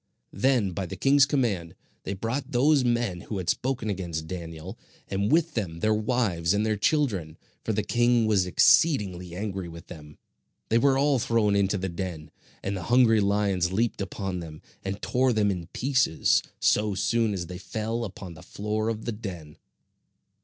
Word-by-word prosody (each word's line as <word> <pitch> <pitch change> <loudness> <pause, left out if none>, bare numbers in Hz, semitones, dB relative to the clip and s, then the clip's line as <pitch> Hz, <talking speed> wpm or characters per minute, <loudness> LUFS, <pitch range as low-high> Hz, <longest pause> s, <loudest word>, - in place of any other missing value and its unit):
Then 125 -7 +2
by 95 +1 -4
the - - -6
king's 140 0 +4
command, 110 - -1 0.3
they 100 - -3
brought 130 +8 -4
those 140 +3 +4
men 120 -7 0
who 105 - -5
had 90 -2 +1
spoken 130 -3 -2
against 85 -6 -3
Daniel, 85 +2 -7 0.3
and 100 +3 -1
with 165 0 +2
them 85 -7 -3
their 110 +4 +2
wives 105 -6 0
and 105 +1 +1
their 110 -1 +1
children, 100 - 0 0.3
for - - -1
the 105 0 0
king 120 +1 +2
was 100 -4 +2
exceedingly 90 - +3
angry 95 -2 -4
with 85 0 -12
them. 75 -4 -11 0.5
They 115 - +4
were 135 +1 +3
all 140 -1 +3
thrown 110 -3 +2
into 100 0 +2
the 95 0 -3
den, 85 -3 -6 0.3
and 100 +1 -2
the 95 - -4
hungry 120 -3 +5
lions 100 -3 +1
leaped 110 +2 0
upon 95 -1 -4
them, 80 -2 -9 0.2
and 95 +1 -4
tore 130 0 +2
them 105 -2 +2
in 90 -3 -5
pieces, 130 - +2 0.2
so 105 -1 +2
soon 110 +3 +1
as 95 -3 -3
they 90 +1 -8
fell 110 +4 -3
upon 95 -4 -7
the 80 - -13
floor 105 +2 -3
of 110 -1 -4
the 120 - -1
den. 90 -9 -8
105 Hz, 175 wpm, -26 LUFS, 90-120 Hz, 0.5 s, hungry